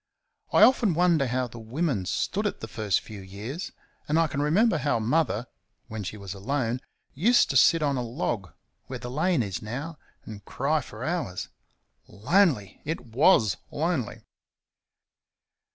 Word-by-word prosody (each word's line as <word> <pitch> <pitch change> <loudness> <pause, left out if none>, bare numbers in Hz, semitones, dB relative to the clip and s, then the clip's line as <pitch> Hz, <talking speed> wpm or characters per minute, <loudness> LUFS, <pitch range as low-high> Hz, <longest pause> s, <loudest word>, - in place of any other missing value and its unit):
I - - +6
often 230 -9 +5
wonder 170 -5 +3
how 130 +1 0
the 120 0 -11
women 115 - -2
stood 205 - -1
it - - -4
the 110 - -6
first 105 0 0
few 105 -3 -10
years; 105 - -6 0.4
and 150 - +1
I 165 - +4
can 150 -2 -2
remember 170 +5 +3
how 140 -2 +1
Mother, 120 0 +1 0.4
when 110 -2 -5
she 100 +3 -6
was 100 -2 -7
alone, 120 +4 -2 0.3
used 230 - +4
to - - -4
sit 165 -2 +5
on 140 -2 +1
a - - -1
log, 115 - -3 0.4
where - - -5
the 125 - -7
lane 155 0 +1
is 100 -3 -4
now, 140 +9 -6 0.3
and 105 -2 -9
cry 145 +8 0
for 110 -1 -9
hours. 160 - -3 0.6
Lonely! 110 - +1
It 160 +3 -3
WAS 120 - +4
lonely. 155 -7 -2
130 Hz, 155 wpm, -26 LUFS, 110-165 Hz, 0.6 s, I